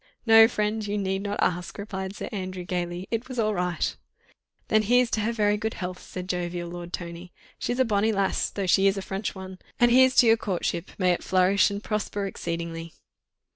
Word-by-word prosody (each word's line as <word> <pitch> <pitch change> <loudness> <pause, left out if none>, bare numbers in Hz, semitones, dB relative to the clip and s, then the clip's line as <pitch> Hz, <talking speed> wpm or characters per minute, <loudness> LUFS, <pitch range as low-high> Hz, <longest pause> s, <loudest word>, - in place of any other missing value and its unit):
"No, 225 -1 +8
friend, 215 -1 -1
you 205 +1 -1
need 190 -1 -1
not 205 0 -2
ask," 180 0 -1
replied 190 -1 -5
Sir - - -5
Andrew, 185 -3 -5
gaily. 175 +1 -3
"It 230 +1 -2
was 255 - -6
all 215 -2 +1
right." 180 -2 -1 0.7
"Then 215 -1 +3
here's 245 +3 +3
to 215 - 0
her 220 +3 0
very 210 -2 +1
good 220 +1 -3
health," 180 0 -5
said 180 -1 -7
jovial 175 -1 -3
Lord 175 0 -7
Tony. 175 0 -7 0.3
"She's 245 - -2
a 260 - +3
bonnie 215 0 +2
lass, 195 -2 0
though 200 - -3
she 195 +2 +4
is 195 0 +2
a 195 - -3
French 195 +2 -4
one. 190 -1 -9 0.2
And 240 0 +5
here's 260 +1 +6
to - - +7
your 225 0 +6
courtship—may 180 -2 -1
it 175 - -1
flourish 185 +2 +3
and 200 +1 -5
prosper 205 -1 -2
exceedingly." 170 -3 -5
195 Hz, 200 wpm, -26 LUFS, 180-215 Hz, 0.7 s, No